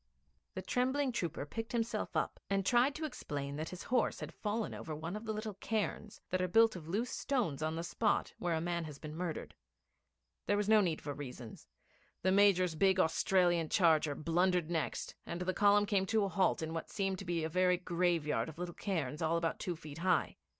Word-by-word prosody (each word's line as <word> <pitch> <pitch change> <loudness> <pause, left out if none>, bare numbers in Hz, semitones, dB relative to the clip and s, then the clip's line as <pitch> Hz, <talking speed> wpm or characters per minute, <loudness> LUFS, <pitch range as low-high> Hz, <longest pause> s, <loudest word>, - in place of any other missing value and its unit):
The 185 - -4
trembling 260 +6 +1
trooper 170 -10 -3
picked 225 +8 -6
himself 230 -1 -1
up, - - -1
and 195 -1 +1
tried 245 +6 +4
to 315 - -3
explain 140 - -4
that 155 +1 -3
his 180 - -7
horse 245 -2 +1
had - - -6
fallen 215 +1 -2
over 155 - -6
one 165 +5 -5
of 215 +2 -6
the 220 - -2
little 215 0 -4
cairns 210 +1 -3
that 185 0 +1
are 185 - +1
built 225 +4 +5
of 165 -4 -8
loose 215 +8 -1
stones 225 - -1
on 155 +1 -1
the 165 - -3
spot 210 +4 0
where 175 -2 0
a - - 0
man 170 0 -1
has 150 -3 -8
been 155 +1 -8
murdered. 170 -1 -4 0.9
There 205 - +3
was 205 -1 0
no 215 -1 +6
need 170 -5 0
for 145 - -3
reasons. 125 -5 -9 0.6
The 185 - +3
Major's 190 -3 +4
big 190 +4 +3
Australian 175 -1 +3
charger 160 -5 +3
blundered 175 +2 +1
next, 165 -2 -2
and 170 +1 -4
the 185 +1 0
column 205 +2 +5
came 195 -2 +1
to 220 0 +2
a 200 - 0
halt 190 -3 +1
in 160 0 -3
what 165 - -4
seemed 195 -2 -1
to 195 - -7
be 170 -2 -1
a - - 0
very 180 +2 +3
graveyard 170 -4 0
of 160 - -11
little 175 0 -4
cairns 160 -7 -3
all 165 +1 +2
about 165 -1 -1
two 180 - -2
feet 155 -1 -10
high. 185 +2 +1
180 Hz, 210 wpm, -34 LUFS, 160-205 Hz, 0.9 s, no